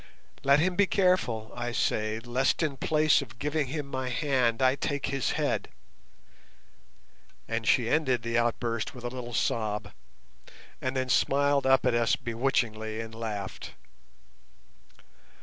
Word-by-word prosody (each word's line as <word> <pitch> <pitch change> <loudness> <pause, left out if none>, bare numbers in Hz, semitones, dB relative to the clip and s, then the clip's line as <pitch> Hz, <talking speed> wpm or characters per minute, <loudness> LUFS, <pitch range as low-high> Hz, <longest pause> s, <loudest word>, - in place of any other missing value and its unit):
Let 140 +1 +5
him 180 +3 +1
be 200 0 +4
careful, 180 - +1
I 120 0 -3
say, 110 -2 0
lest 125 +7 0
in 150 -3 -1
place 155 +2 +3
of 110 +1 -10
giving 145 +2 -1
him 145 +2 -4
my 130 -2 -4
hand 125 -3 +1
I 130 -1 +4
take 140 0 -2
his 135 -2 -1
head," - - -1 1.8
and 115 -1 -2
she 120 +2 +3
ended 130 -4 +1
the 115 0 -2
outburst 115 0 -1
with 125 - -10
a 120 - -2
little 120 -1 -6
sob, 105 -2 -1 0.9
and 130 +1 -2
then 130 0 0
smiled 140 +1 +2
up 135 0 +4
at 125 - +3
us 120 0 +3
bewitchingly 115 -3 -1
and 115 0 -6
laughed. 105 -4 -5
125 Hz, 140 wpm, -28 LUFS, 115-140 Hz, 1.8 s, Let